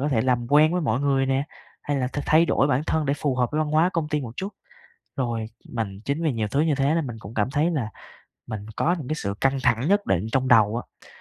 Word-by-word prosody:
có 145 Hz, -, 0 dB
thể 115 Hz, -6 st, +2 dB
làm 125 Hz, -1 st, +1 dB
quen 155 Hz, +3 st, +6 dB
với 180 Hz, -, +1 dB
mọi 130 Hz, -3 st, 0 dB
người 135 Hz, -1 st, +2 dB
nè, 135 Hz, +1 st, +1 dB, 0.4 s
hay 145 Hz, -1 st, -1 dB
là 130 Hz, -2 st, 0 dB
th 145 Hz, -, -5 dB
thay 160 Hz, +2 st, +5 dB
đổi 135 Hz, -, +2 dB
bản 140 Hz, 0 st, +1 dB
thân 160 Hz, -2 st, 0 dB
để 140 Hz, -, +1 dB
phù 145 Hz, -2 st, -1 dB
hợp 125 Hz, -1 st, +1 dB
với 155 Hz, -, 0 dB
văn 155 Hz, -1 st, 0 dB
hóa 160 Hz, +4 st, +3 dB
công 165 Hz, -3 st, -1 dB
ty 150 Hz, -1 st, 0 dB
một 120 Hz, -4 st, -6 dB
chút. 195 Hz, -, -3 dB, 0.7 s
Rồi 120 Hz, -4 st, -1 dB, 0.2 s
mình 105 Hz, -5 st, -4 dB
chính 140 Hz, +4 st, -1 dB
vì 155 Hz, -4 st, +1 dB
nhiều 110 Hz, -3 st, -2 dB
thứ 140 Hz, +7 st, 0 dB
như 155 Hz, -2 st, +2 dB
thế 140 Hz, +3 st, +1 dB
nên 165 Hz, -4 st, 0 dB
mình 120 Hz, -2 st, -6 dB
cũng 110 Hz, +1 st, -10 dB
cảm 110 Hz, +3 st, 0 dB
thấy 150 Hz, +5 st, +1 dB
là 130 Hz, -10 st, -1 dB, 0.6 s
mình 105 Hz, -2 st, -5 dB
có 175 Hz, +3 st, +1 dB
những 135 Hz, -, -7 dB
cái 155 Hz, -, -1 dB
sự 100 Hz, -10 st, -3 dB
căng 135 Hz, 0 st, +2 dB
thẳng 125 Hz, +3 st, +2 dB
nhất 205 Hz, +1 st, +2 dB
định 95 Hz, +3 st, 0 dB
trong 130 Hz, -1 st, +1 dB
đầu 115 Hz, -2 st, +5 dB
á. -, -, -10 dB
135 Hz, 275 wpm, -24 LUFS, 120-155 Hz, 0.7 s, quen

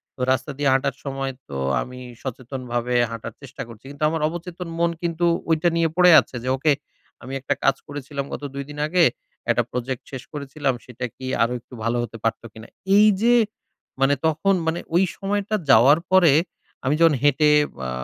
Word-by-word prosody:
তো -, -, -22 dB
রাস্তা 130 Hz, +2 st, 0 dB
দিয়ে 145 Hz, -1 st, +2 dB
হাঁটার 135 Hz, 0 st, +1 dB
সময় 135 Hz, -1 st, -3 dB, 0.2 s
তো 70 Hz, -, -5 dB, 0.2 s
আমি 125 Hz, 0 st, -8 dB, 0.2 s
সচেতনভাবে 125 Hz, -1 st, -3 dB, 0.2 s
হাঁটার 115 Hz, 0 st, -6 dB
চেষ্টা 135 Hz, -1 st, -9 dB
করছি। 115 Hz, +2 st, -14 dB
কিন্তু 145 Hz, +1 st, -6 dB
আমার 160 Hz, -1 st, -2 dB
অবচেতন 175 Hz, +2 st, -6 dB
মন 170 Hz, -, +3 dB
কিন্তু 170 Hz, 0 st, -1 dB, 0.2 s
ঐটা 160 Hz, +2 st, +3 dB
নিয়ে 165 Hz, -1 st, +2 dB
পড়ে 180 Hz, 0 st, +7 dB
আছে। -, -, -5 dB
যে 130 Hz, -, -2 dB
ওকে 150 Hz, +3 st, +2 dB, 0.5 s
আমি 130 Hz, -, -7 dB
একটা 135 Hz, -, -1 dB
কাজ 135 Hz, -, +4 dB
করেছিলাম 140 Hz, -1 st, -5 dB
গত -, -, -6 dB
২ 140 Hz, -, -4 dB
দিন 150 Hz, -, -9 dB
আগে, 175 Hz, +1 st, +3 dB, 0.5 s
একটা 120 Hz, +1 st, +3 dB
project 125 Hz, 0 st, -3 dB
শেষ 130 Hz, -2 st, -6 dB
করেছিলাম, 140 Hz, -1 st, -2 dB
সেটা 125 Hz, 0 st, -6 dB
কি 130 Hz, -, -9 dB, 0.2 s
আরো 120 Hz, +2 st, 0 dB
একটু 120 Hz, -, -20 dB
ভালো 115 Hz, +1 st, 0 dB
হতে 115 Hz, 0 st, -7 dB
পারতো 115 Hz, +1 st, -1 dB
কিনা? 110 Hz, +1 st, -11 dB, 0.3 s
এইযে 215 Hz, +3 st, +5 dB, 0.7 s
মানে 135 Hz, +1 st, +4 dB
তখন 165 Hz, +5 st, +2 dB
মানে 165 Hz, +2 st, 0 dB, 0.2 s
ওই 180 Hz, -, +5 dB
সময়টা 205 Hz, +2 st, -1 dB
যাওয়ার 135 Hz, +7 st, +7 dB
পরে, 175 Hz, -6 st, +6 dB, 0.5 s
আমি 140 Hz, -, +2 dB
যখন 165 Hz, -3 st, +5 dB
হেঁটে, 145 Hz, +1 st, +4 dB, 0.4 s
আ -, -, -3 dB
140 Hz, 180 wpm, -23 LUFS, 125-165 Hz, 0.7 s, পড়ে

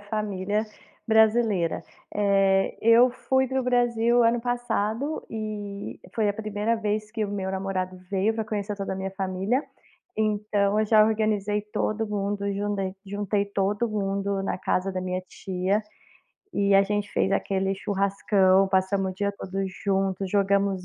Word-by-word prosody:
família 205 Hz, 0 st, -2 dB, 0.4 s
brasileira. 220 Hz, -5 st, +3 dB, 0.3 s
Eh, 195 Hz, -1 st, +2 dB
eu 230 Hz, +3 st, +7 dB
fui 265 Hz, +1 st, 0 dB
para 265 Hz, -, -1 dB
o 260 Hz, -, +1 dB
Brasil 240 Hz, -1 st, +2 dB
o -, -, +6 dB
ano 230 Hz, +1 st, +3 dB
passado, 245 Hz, +3 st, -2 dB
e 210 Hz, -2 st, -5 dB, 0.2 s
foi 215 Hz, -3 st, +2 dB
a -, -, +2 dB
1º 215 Hz, +1 st, -1 dB
vez 215 Hz, 0 st, -2 dB
que 220 Hz, -1 st, -2 dB
o 205 Hz, -, -4 dB
meu 195 Hz, -2 st, -3 dB
namorado 190 Hz, -1 st, -3 dB
veio 200 Hz, +3 st, +1 dB
pra 220 Hz, -, -2 dB
conhecer 210 Hz, -1 st, -3 dB
toda 195 Hz, -1 st, -3 dB
a -, -, -4 dB
minha 190 Hz, 0 st, -3 dB
família, 195 Hz, +7 st, -1 dB, 0.5 s
então, 210 Hz, -1 st, +1 dB
eu 215 Hz, -, +2 dB
já 215 Hz, 0 st, +6 dB
organizei 210 Hz, -1 st, 0 dB
todo 215 Hz, +1 st, -2 dB
mundo, 200 Hz, 0 st, -2 dB
jundei 195 Hz, -1 st, -2 dB
juntei 200 Hz, +1 st, -1 dB
todo 200 Hz, +3 st, 0 dB
mundo 200 Hz, -1 st, -1 dB
na -, -, -2 dB
casa 185 Hz, +1 st, 0 dB
da 185 Hz, -, -3 dB
minha 185 Hz, 0 st, -2 dB
tia. 190 Hz, +3 st, -1 dB, 0.7 s
E 200 Hz, 0 st, +2 dB
a 195 Hz, -, +7 dB
gente 205 Hz, +1 st, -2 dB
fez -, -, +1 dB
aquele 195 Hz, -1 st, 0 dB
churrascão, 195 Hz, -1 st, +2 dB
passamos 190 Hz, 0 st, +1 dB
o -, -, -15 dB
dia 200 Hz, +1 st, 0 dB
todo 185 Hz, -, -8 dB, 0.2 s
junto, 195 Hz, 0 st, -1 dB
jogamos 195 Hz, -1 st, +1 dB
205 Hz, 155 wpm, -26 LUFS, 195-215 Hz, 0.7 s, eu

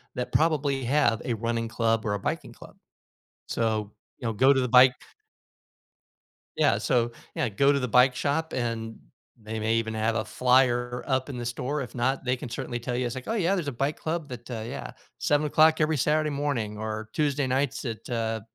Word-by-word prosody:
that 125 Hz, -, -3 dB
probably 145 Hz, -4 st, +2 dB
have 120 Hz, -3 st, +2 dB
a 120 Hz, -, -1 dB
running 115 Hz, +1 st, -2 dB
club 115 Hz, -1 st, 0 dB
or 105 Hz, -, 0 dB
a 100 Hz, -, -2 dB
biking -, -, -3 dB
club. -, -, -14 dB, 0.7 s
So, 110 Hz, -2 st, -1 dB, 0.3 s
you 120 Hz, -, -3 dB
know, 115 Hz, -, -1 dB
go 130 Hz, +6 st, +5 dB
to 130 Hz, -, +1 dB
the 125 Hz, -, -1 dB
bike 125 Hz, +1 st, +7 dB, 1.6 s
Yeah, -, -, +3 dB
so 120 Hz, -1 st, +1 dB, 0.2 s
Yeah, -, -, 0 dB
go 140 Hz, +7 st, +3 dB
to 140 Hz, -, +1 dB
the 125 Hz, -, -2 dB
bike 125 Hz, +2 st, +5 dB
shop 160 Hz, +4 st, -1 dB
and 115 Hz, -2 st, -3 dB, 0.4 s
they 110 Hz, 0 st, -6 dB
may 110 Hz, +1 st, +1 dB
even 115 Hz, -1 st, 0 dB
have 110 Hz, +1 st, 0 dB
a 110 Hz, -, 0 dB
flyer 125 Hz, 0 st, +2 dB
up 130 Hz, 0 st, 0 dB
in 130 Hz, -, -5 dB
the 120 Hz, -, -4 dB
store, 125 Hz, +5 st, -2 dB
if 120 Hz, -2 st, -9 dB
not, 130 Hz, +2 st, 0 dB
they 125 Hz, 0 st, +1 dB
can 125 Hz, -, -7 dB
certainly 120 Hz, 0 st, -4 dB
tell 120 Hz, 0 st, -3 dB
you, 125 Hz, -, -1 dB
it's 120 Hz, -, -3 dB
like, 130 Hz, -1 st, -7 dB
"Oh 225 Hz, -, 0 dB
yeah, 195 Hz, -3 st, +2 dB
there's 170 Hz, -7 st, -2 dB
a -, -, -1 dB
bike 135 Hz, +5 st, -2 dB
club 160 Hz, -1 st, -3 dB
that, 120 Hz, 0 st, -8 dB
uh 110 Hz, -3 st, -4 dB
Yeah, -, -, -6 dB, 0.3 s
7:00 155 Hz, +2 st, +3 dB
every 155 Hz, 0 st, +2 dB
Saturday 150 Hz, +3 st, +2 dB
morning 140 Hz, -8 st, -2 dB
or 110 Hz, 0 st, -4 dB
Tuesday 145 Hz, -2 st, 0 dB
nights 135 Hz, +1 st, -1 dB
at, 115 Hz, -3 st, -5 dB
uh, 115 Hz, -2 st, -1 dB
125 Hz, 205 wpm, -27 LUFS, 115-140 Hz, 1.6 s, bike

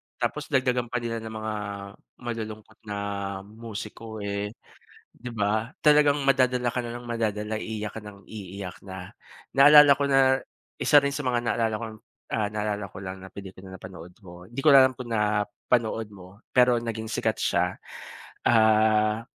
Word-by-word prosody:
Tapos -, -, -3 dB
dagdagan 125 Hz, -2 st, +1 dB
pa -, -, -5 dB
nila 115 Hz, -1 st, -3 dB
ng 110 Hz, -, -6 dB
mga 110 Hz, 0 st, -3 dB, 0.7 s
malulungkot 110 Hz, -2 st, -6 dB
na 105 Hz, -, -4 dB, 0.5 s
musiko 110 Hz, +1 st, -8 dB
eh. 100 Hz, 0 st, -3 dB, 0.6 s
Di 125 Hz, -, -9 dB
ba? 110 Hz, +1 st, 0 dB, 0.2 s
Talagang 150 Hz, -1 st, +6 dB
madadala 125 Hz, -2 st, +3 dB
ka 125 Hz, -, -1 dB
na 120 Hz, -1 st, -6 dB
nang 120 Hz, -, -9 dB
madadala 110 Hz, -2 st, -2 dB
iiyak 110 Hz, -1 st, -4 dB
ka -, -, -4 dB
nang 100 Hz, -1 st, -12 dB
iiyak 100 Hz, -3 st, -8 dB
na 95 Hz, -1 st, -8 dB, 0.4 s
naalala 145 Hz, +1 st, +9 dB
ko 145 Hz, -, 0 dB
na 135 Hz, -1 st, +4 dB, 0.4 s
isa 150 Hz, -, +4 dB
rin 140 Hz, 0 st, -1 dB
sa 145 Hz, 0 st, -4 dB
mga 120 Hz, -1 st, 0 dB
naalala 115 Hz, -2 st, 0 dB
ko -, -, -3 dB, 0.5 s
ah, 105 Hz, -2 st, 0 dB
naalala 105 Hz, -1 st, -3 dB
ko 95 Hz, -, -11 dB
lang 95 Hz, 0 st, -5 dB
na 95 Hz, -, -10 dB
pelikula 95 Hz, -1 st, -10 dB
napanood 90 Hz, -2 st, -10 dB
ko, 90 Hz, -3 st, -13 dB
hindi 120 Hz, +3 st, -5 dB
ko -, -, +6 dB
lang 135 Hz, -, +10 dB
alam 130 Hz, -, -3 dB
kung 125 Hz, -1 st, -8 dB
napanood 105 Hz, +1 st, 0 dB
mo 95 Hz, +2 st, -14 dB
pero 125 Hz, -1 st, +5 dB
naging 110 Hz, -1 st, -4 dB
sikat 110 Hz, 0 st, 0 dB
siya -, -, 0 dB, 0.7 s
ah, 110 Hz, -1 st, +4 dB
110 Hz, 160 wpm, -26 LUFS, 105-120 Hz, 0.7 s, lang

